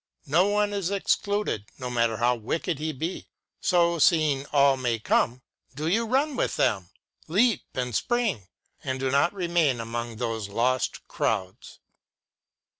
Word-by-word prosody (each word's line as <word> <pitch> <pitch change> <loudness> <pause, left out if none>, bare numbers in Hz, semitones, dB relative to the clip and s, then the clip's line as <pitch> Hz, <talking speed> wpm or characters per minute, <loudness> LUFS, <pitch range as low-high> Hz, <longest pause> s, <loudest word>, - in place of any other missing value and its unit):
No 165 +7 +3
one 205 0 +1
is 195 -3 -1
excluded, 200 - 0
no 125 -2 -5
matter 115 -2 +1
how 120 +2 +3
wicked 145 +7 -3
he 155 +1 -2
be. 160 +6 -5 0.3
So, 170 -2 +2
seeing 150 -4 +3
all 140 -1 +4
may 125 -3 -1
come, 120 +3 0 0.3
do 150 +2 -4
you 225 +7 +1
run 275 +4 +1
with - - -1
them, 95 -5 0 0.4
leap 220 +7 +3
and 125 -1 -2
spring, 225 - 0 0.4
and 130 0 -3
do 135 0 -1
not 140 +6 +3
remain 170 -9 +1
among 115 0 -4
those 115 -3 -3
lost 125 +5 -1
crowds. 95 -4 -3
140 Hz, 145 wpm, -26 LUFS, 120-180 Hz, 0.4 s, all